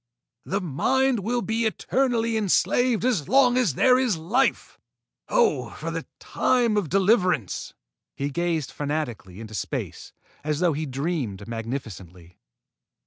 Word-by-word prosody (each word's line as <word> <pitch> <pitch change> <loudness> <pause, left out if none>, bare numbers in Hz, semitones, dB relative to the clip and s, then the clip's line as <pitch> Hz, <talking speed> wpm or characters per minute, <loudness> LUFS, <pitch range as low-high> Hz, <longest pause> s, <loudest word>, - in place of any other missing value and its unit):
The 195 +1 -1
Mind 250 - +1
will 235 +4 -1
be 225 +1 0
eternally 230 0 0
enslaved 220 +3 +2
as 205 - 0
long 255 -1 +5
as 240 - +2
there 255 -1 +5
is 245 -9 +1
life! 220 +12 0 0.5
Oh, 475 -3 +2
for - - -4
the - - -5
time 240 -4 +1
of 200 -7 0
deliverance!" 185 - +1 0.4
He 140 +1 -3
gazed 170 -2 -1
fanatically 140 - -4
into 110 -1 -9
space, 105 - -5 0.3
as 150 0 -1
though 175 -2 +2
he 155 +2 -3
dreamed 135 - -3
magnificently. 110 -8 -7
180 Hz, 130 wpm, -25 LUFS, -, 0.5 s, long